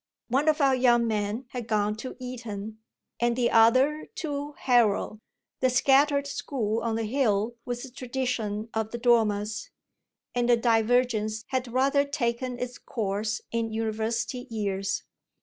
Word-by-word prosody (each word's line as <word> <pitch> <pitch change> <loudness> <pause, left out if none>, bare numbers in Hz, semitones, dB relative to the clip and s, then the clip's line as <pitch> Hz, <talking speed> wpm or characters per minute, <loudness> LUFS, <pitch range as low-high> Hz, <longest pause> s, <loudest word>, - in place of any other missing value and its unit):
One 270 +5 +1
of 310 0 +2
our 275 -1 +5
young 240 -2 +4
men 215 +2 -1
had 245 -2 -6
gone 210 -1 +1
to 255 +4 -6
Eton 220 -4 -6 0.4
and 235 0 +2
the 240 -1 +1
other 255 +7 +4
to 290 -2 -4
Harrow 230 -5 +2 0.4
the 260 - +3
scattered 280 +3 +4
school 230 -6 -2
on 230 -1 -1
the 225 - -1
hill 220 -2 +1
was 245 0 -4
the 265 - -9
tradition 245 -4 -3
of 220 -1 -1
the 235 - -5
Dormers 220 -3 +1 0.6
and 245 0 0
the 240 - +6
divergence 225 -1 +1
had 255 -2 -2
rather 275 +3 +3
taken 255 -3 -2
its 250 0 -5
course 210 0 -2
in 230 -1 -1
university 225 +3 -2
years. 195 -3 -2
235 Hz, 145 wpm, -27 LUFS, 220-255 Hz, 0.6 s, the